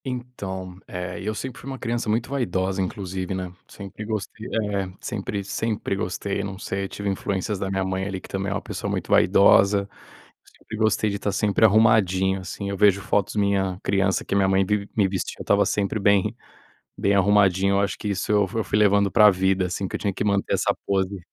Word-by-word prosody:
Então, 100 -8 -6
eh, 90 -1 -5
eu 110 +2 -3
sempre 130 +3 -6
fui 135 - -8
uma 135 - -5
criança 120 -2 -2
muito 115 +3 0
vaidosa, 95 -7 -1
inclusive, 95 0 -4
né, 90 -1 -5
sempre 100 +1 -9
gostei 110 +1 -5 0.3
É, 95 -2 -2
sempre 100 -1 -4
sempre 105 +1 -2
gostei. 100 0 -3
Não 95 -1 -5
sei, 100 0 -3
eu - - -4
tive 100 - -5
influências 100 0 -2
da 95 - -2
minha 95 0 -1
mãe, 95 0 -2
ali, 95 -1 -4
que - - -13
também 95 +1 -3
é - - 0
uma - - -2
pessoa - - -5
muito - - -3
vaidosa. 100 +1 +5 0.5
Eu - - -35
sempre 110 - -9
gostei 110 0 +2
de 100 - -4
tá 100 - -1
sempre 105 +1 +2
arrumadinho, 95 -3 +3
assim. 95 +2 -6
Eu 100 - -3
vejo 100 -1 +4
fotos 100 +1 0
minha 100 -2 0
criança 95 -1 +1
que - - -4
a - - +3
minha 95 -1 +3
mãe 95 0 +3
vivi 100 +1 -1
me 100 -3 +4
vestia; 95 -1 -3
eu - - -5
estava 100 0 +3
sempre 100 +1 -1
bem 100 -1 +2 0.6
bem 100 - +1
arrumadinho. 100 -1 +3
Eu 100 - +3
acho 100 - -1
que 105 - -5
isso 100 +1 -2
eu 105 -2 +3
fu 110 +4 -2
fui 105 - -1
levando 100 -1 +3
pra 105 -1 +7
vida, 95 0 +1
assim, 95 +2 -3
que - - -4
eu - - -3
tinha 100 -2 -1
que - - -3
manter 100 -1 0
essa - - +1
pose. 95 0 0
100 Hz, 215 wpm, -24 LUFS, 95-105 Hz, 0.6 s, pra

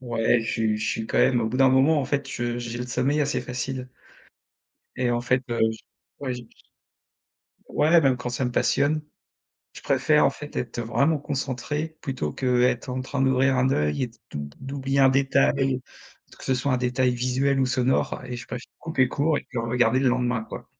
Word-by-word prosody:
Ouais 120 -1 +1
je 115 - -3
suis 110 -2 0
je 110 0 -1
suis 110 - -3
quand - - -1
même 120 -2 +4
au 110 - 0
bout 120 - -3
d'un 135 0 +6
moment 135 +4 +4
en - - -2
fait 140 +1 -2
je 120 -2 -3
j'ai 120 0 -5
le 125 - -4
sommeil 135 +5 +1
assez 145 -1 0
facile 125 +1 -4 1.1
et 125 -1 0
en 120 0 +1
fait, 125 +1 +1
heu, 120 - -1
j 110 - -11 0.4
ouais 130 -3 -2
je 125 - -7
je - - -24 1.1
Ouais, 160 +3 +4
même 135 -4 +3
quand 125 0 -4
ça 125 +1 -2
me 125 - -2
passionne. 150 +5 +1 0.7
Je - - -11
préfère 145 +3 +3
en - - +4
fait 145 0 -10
être 120 -1 -3
vraiment 140 +8 +1
concentré 145 +3 -3
plutôt 130 - -3
qu'être 125 - +1
en 130 0 -2
train 135 +1 -4
d'ouvrir 130 0 +3
un 130 +1 +2
œil 75 - 0
et - - -3 0.2
d'ou - - -5
d'oub 70 0 -7
d'oublier 135 0 -1
un 135 - +7
détail, 135 0 +2 0.6
que - - -11
ce 130 - +1
soit 130 +2 0
un - - +3
détail 125 +1 +1
visuel 130 +3 +1
ou 130 - +2
sonore 130 0 0
et 125 -1 -5
je 120 - -9
préfère 125 0 -7
couper 135 -6 +1
court 150 +4 +1
et - - -9
puis 125 - -5
regarder 115 +1 +2
le 135 - +3
lendemain 125 -2 0
quoi. - - -9
130 Hz, 210 wpm, -25 LUFS, 120-135 Hz, 1.1 s, un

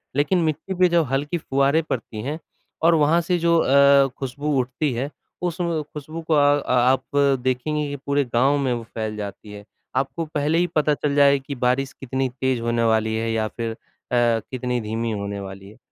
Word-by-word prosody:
लेकिन 150 +6 +2
मिट्टी 160 +4 -2
पे 185 - +6
जो 170 -1 +3
हल्की 145 +5 -1
फुआरें 140 0 +1
पड़ती 110 -3 -4
हैं, 150 +6 -4 0.4
और 165 +1 +5
वहाँ 160 +2 +3
से 175 +1 0
जो 170 0 +3
अ, 140 -1 +5
ख़ुशबू 140 +2 -2
उठती 130 +4 -1
है, 130 +4 -2 0.3
उस 175 0 -2
व 170 -3 0
ख़ुशबू 155 +2 -8
को 160 0 -1
अ 145 -1 +4
आप 125 +1 +3 0.4
देखेंगी 145 +4 -1
कि 145 - -4
पूरे 140 0 +2
गाँव 135 +5 +3
में 135 -3 0
वो 120 -1 -4
फैल 110 -1 -5
जाती 105 0 -7
है। 105 0 -10 0.3
आपको 135 +5 -1
पहले 150 +1 0
ही 175 +1 +2
पता 150 -1 +3
चल 145 0 -1
जाएगा 140 -1 +4
कि 140 - -4
बारिश 125 +2 0
कितनी 130 0 -2
तेज़ 130 0 -1
होने 115 0 0
वाली 110 -1 +2
है 115 +1 -1
या 110 -1 0
फिर 115 +1 -4
अ, - - -7 0.4
कितनी 120 +1 0
धीमी 115 +2 -3
होने 100 -1 -4
वाली 95 0 -9
है। 110 - -16
135 Hz, 195 wpm, -23 LUFS, 115-150 Hz, 0.4 s, पे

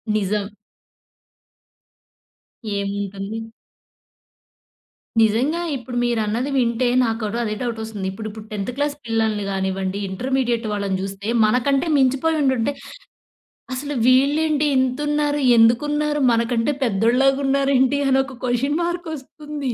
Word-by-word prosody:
నిజం. 205 0 0 2.3
ఏముంటుంది? 200 +2 -4 1.7
నిజంగా 255 +10 +2
ఇప్పుడు 245 -1 -6
మీరన్నది 235 +2 0
వింటే 240 0 +1 0.2
నాకు 225 -1 -1
కూడా 215 +2 -2
అదే 215 - -2
డౌట్ 235 -2 -3
ఒస్తుంది. 210 -4 -5
ఇప్పుడు 215 +3 -6
ఇప్పుడు 215 0 -10
10థ్ 250 +8 -2
పిల్లల్ని 220 -2 0
గానివ్వండి, 190 0 -2
ఇంటర్మీడియేట్ 245 +2 -1
వాళ్ళని 200 -2 -1
జూస్తే, 195 +2 -5 0.2
మనకంటే 270 +7 +1
మించిపోయి 275 +5 +2
ఉండుంటే, 265 0 +1 1.0
అసలు 285 +2 -4
వీళ్ళేంటి 290 +3 +3
ఇంతున్నారు? 295 +3 0 0.2
ఎందుకున్నారు? 295 +6 +3
మనకంటే 230 +4 +1
పెద్దోళ్ళలాగున్నారేంటి? 270 +4 +2
అని 265 0 +4
ఒక 265 -3 -11
క్వెషన్ 265 +5 0
మార్క్ 345 -1 -3
ఒస్తుంది. 290 -1 -6
245 Hz, 100 wpm, -21 LUFS, 215-280 Hz, 2.3 s, అని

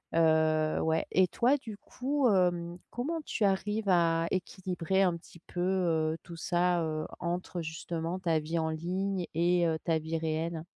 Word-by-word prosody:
heu, 155 -1 +3
ouais. 160 0 +1
Et 185 -1 +4
toi, 255 +9 +2
du 225 -6 -8
coup, 270 +2 0
hem, 175 -3 +1
comment 310 +8 -3
tu 215 - -2
arrives 210 +2 0
à 165 -2 +3
équilibrer 185 0 -1
un 175 -2 +2
petit 170 0 -16
peu, 175 - -8
heu, 165 -4 +1
tout 170 -1 -10
ça, 175 0 +1
heu, 155 -1 -2
entre 175 0 -3
justement 165 +2 -4
ta 165 -4 +1
vie 160 +2 -2
en 160 0 0
ligne 180 +3 -2
et 175 +1 +3
heu, 160 -1 0
ta 160 -1 +2
vie 160 +1 -3
réelle? 160 0 -2
170 Hz, 165 wpm, -30 LUFS, 160-190 Hz, -, Et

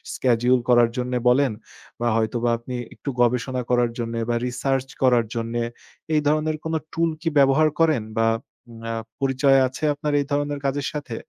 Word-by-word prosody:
schedule 125 0 +2
করার 120 -1 +5
জন্য 125 0 -2 0.2
বলেন 135 0 +3 0.5
বা 120 - 0
হয়তোবা 115 +2 0
আপনি 120 +2 -7 0.2
একটু 140 - -7
গবেষণা 125 +1 +1
করার 120 -1 +2
জন্যে 115 0 -3
বা 120 - +1
রিসার্চ 135 +1 -1 0.2
করার 125 -3 +4
জন্যে, 115 +1 -2 0.5
এই 150 - +3
ধরনের 155 +1 +1
কোনো 160 0 -1 0.2
টুল 165 0 +1
কি 165 - 0
ব্যবহার 140 +3 +5
করেন 155 -7 +3 0.2
বা 115 - +3 0.4
উম 115 -1 -12
অ্যা 115 0 -3 0.2
পরিচয় 135 0 +3
আছে 130 +4 -9
আপনার 150 +1 -3
এই 140 - -1
ধরনের 145 0 -1
কাজের 135 -1 -1
সাথে? 140 -6 -5
130 Hz, 170 wpm, -23 LUFS, 120-145 Hz, 0.5 s, করার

